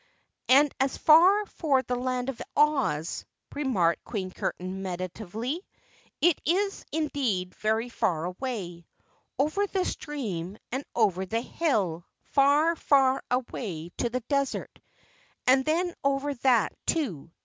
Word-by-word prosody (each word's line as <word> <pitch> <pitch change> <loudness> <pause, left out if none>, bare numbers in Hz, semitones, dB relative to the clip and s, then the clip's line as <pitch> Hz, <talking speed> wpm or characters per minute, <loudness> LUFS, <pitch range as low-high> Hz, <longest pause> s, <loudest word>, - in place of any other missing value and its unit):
"And 280 +2 +6
as 270 0 +1
for 330 -4 +4
the 250 - -2
Land 250 +1 -2
of 265 - -5 0.2
Oz," 270 - +2 0.3
remarked 205 - +1
Queen 190 -5 -4
Curtain 185 +1 -4
meditatively, 200 - -4 0.6
"it 345 -2 +3
is 390 +5 0
indeed 260 -13 -1
very 220 +2 0
far 170 -8 -1
away 180 -4 -5 0.5
over 310 +10 +1
the 380 -2 -1
stream 205 - -4
and 260 +3 -2
over 190 -5 +2
the 225 +4 -1
hill 205 - -1 0.2
far, 290 +4 +3
far 270 -4 +3
away 210 -9 -3
to 240 - 0
the 255 +2 -2
desert, 275 +2 -2 0.7
and 265 +1 +5
then 340 +4 0
over 275 +1 +1
that, 245 -3 +2
too. 205 - -1
255 Hz, 120 wpm, -27 LUFS, 190-295 Hz, 0.7 s, And